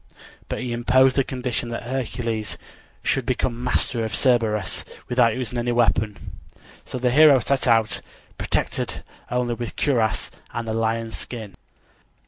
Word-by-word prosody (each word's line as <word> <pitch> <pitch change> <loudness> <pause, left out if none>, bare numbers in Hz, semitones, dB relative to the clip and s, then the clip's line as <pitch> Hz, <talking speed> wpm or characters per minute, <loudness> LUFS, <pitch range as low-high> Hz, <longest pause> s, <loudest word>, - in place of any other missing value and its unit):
But - - -3
he 125 -1 -3
imposed 130 +2 +4
the 135 - +3
condition 125 -2 -3
that 120 - -4
Hercules 120 -3 -2 0.5
should 135 - +1
become 120 0 -1
master 125 -1 +1
of 110 -3 -2
Cerberus 110 -6 +1 0.2
without 120 -2 +3
using 125 -1 -2
any 120 +1 0
weapons. 110 -3 +2 0.7
So - - -5
the 125 0 +1
hero 150 +1 +8
set 135 +3 0
out, 115 -2 +3 0.3
protected - - -1 0.3
only 125 0 0
with 120 0 -5
cuirass 115 -8 +1 0.2
and 115 -1 -3
the 110 - -1
lion 115 0 0
skin. 110 -5 -6
120 Hz, 140 wpm, -23 LUFS, 115-125 Hz, 0.7 s, hero